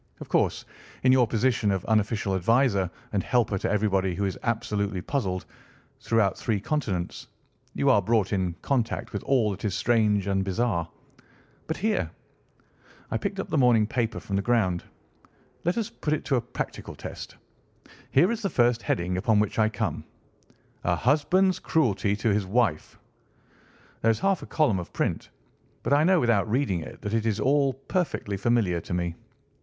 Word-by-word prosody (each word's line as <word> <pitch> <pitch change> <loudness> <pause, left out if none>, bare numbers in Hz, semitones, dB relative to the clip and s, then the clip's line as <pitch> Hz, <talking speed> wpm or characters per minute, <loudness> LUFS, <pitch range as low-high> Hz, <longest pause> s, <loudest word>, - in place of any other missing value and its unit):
"Of - - -9
course, - - +1 0.4
in 130 - +5
your 130 -2 +5
position 115 -1 +1
of 95 -2 -1
unofficial 105 -2 +1
adviser 100 0 +2 0.2
and 100 - +2
helper 110 -5 +1
to - - -1
everybody 95 -3 +1
who 100 - -1
is 95 - -2
absolutely 105 -4 -1
puzzled, 95 -4 -2 0.5
throughout 115 -4 +1
three 110 -3 -1
continents, 100 - -3 0.5
you 140 - 0
are 105 - +4
brought 105 -1 +1
in 90 -3 0
contact 120 -5 -1
with 100 - -3
all 120 -6 +2
that 95 - -7
is 105 -3 -1
strange 105 -4 +2
and 95 -1 0
bizarre. 95 -4 -1 0.8
But 160 - -2
here"—I 205 - -6
picked - - -3
up - - -4
the - - +1
morning 120 -4 +5
paper 115 +1 -2
from 100 - -4
the - - +1
ground—"let 115 - -3
us 225 -3 -2
put 150 - -2
it - - -7
to 135 - +1
a - - 0
practical 120 - -6
test. - - -8 0.7
Here 175 +10 +4
is 235 -1 -3
the 200 - -1
first 120 -4 +2
heading 90 -2 -1
upon 110 +3 +2
which 105 +1 0
I 110 0 +4
come. 105 - -3 0.8
'A - - +2
husband's 175 +8 +2
cruelty 105 -9 +1
to 110 0 +1
his 100 -2 0
wife.' 100 -7 0 1.0
There 115 - +3
is 110 - +2
half 195 -2 +2
a - - -9
column 140 - +2
of 85 - -8
print, - - -2 0.5
but - - +1
I 145 +2 +5
know 185 +1 +4
without 115 -4 +2
reading 115 -6 +1
it - - -10
that 105 - -3
it 115 0 +1
is 110 -1 0
all 140 +3 +2
perfectly 135 - -2
familiar 100 -4 +1
to 90 - -4
me. 85 -1 -1
110 Hz, 170 wpm, -26 LUFS, 100-130 Hz, 1.0 s, in